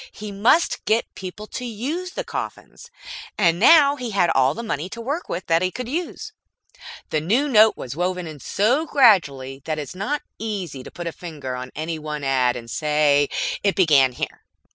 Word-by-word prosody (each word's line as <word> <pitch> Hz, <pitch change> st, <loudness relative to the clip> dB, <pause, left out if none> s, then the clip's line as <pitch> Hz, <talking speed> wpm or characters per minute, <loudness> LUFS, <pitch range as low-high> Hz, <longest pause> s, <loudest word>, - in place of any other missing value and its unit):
He 210 Hz, 0 st, -8 dB
must 225 Hz, +12 st, +2 dB
get 225 Hz, +2 st, 0 dB
people 190 Hz, +3 st, -8 dB
to 250 Hz, -, -7 dB
use 280 Hz, -, -4 dB
the -, -, -3 dB
coffins; 470 Hz, -, -7 dB, 0.5 s
and 170 Hz, -4 st, +3 dB
now 285 Hz, -, +7 dB
he 250 Hz, -3 st, -4 dB
had 195 Hz, -5 st, +2 dB
all 135 Hz, +2 st, +3 dB
the 235 Hz, -, -5 dB
money 180 Hz, -6 st, -3 dB
to 235 Hz, -, -8 dB
work 285 Hz, +9 st, -4 dB
with 180 Hz, +2 st, -4 dB
that 165 Hz, 0 st, +2 dB
he 185 Hz, -, +1 dB
could 245 Hz, +5 st, -6 dB
use. 355 Hz, -, -4 dB, 0.8 s
The 155 Hz, -, +1 dB
new 230 Hz, -, +1 dB
note 220 Hz, -4 st, +5 dB
was 130 Hz, +1 st, -6 dB
woven 180 Hz, +1 st, -1 dB
in 155 Hz, -3 st, -9 dB
so 245 Hz, -, +1 dB
gradually 145 Hz, -, +3 dB
that 155 Hz, -1 st, -2 dB
it 150 Hz, -, -3 dB
is 145 Hz, -, -10 dB
not 265 Hz, +11 st, -2 dB, 0.2 s
easy 195 Hz, -11 st, -4 dB
to -, -, -10 dB
put 175 Hz, -, -8 dB
a 170 Hz, -, -2 dB
finger 150 Hz, -7 st, -7 dB
on 125 Hz, 0 st, -6 dB
any 160 Hz, +1 st, -4 dB
one 150 Hz, -1 st, -5 dB
ad 130 Hz, -2 st, +2 dB
and 120 Hz, -1 st, -8 dB
say, 150 Hz, +1 st, +2 dB, 0.3 s
"It 200 Hz, -1 st, +1 dB
began 145 Hz, -9 st, +4 dB
here." -, -, -6 dB
185 Hz, 195 wpm, -22 LUFS, 150-235 Hz, 0.8 s, now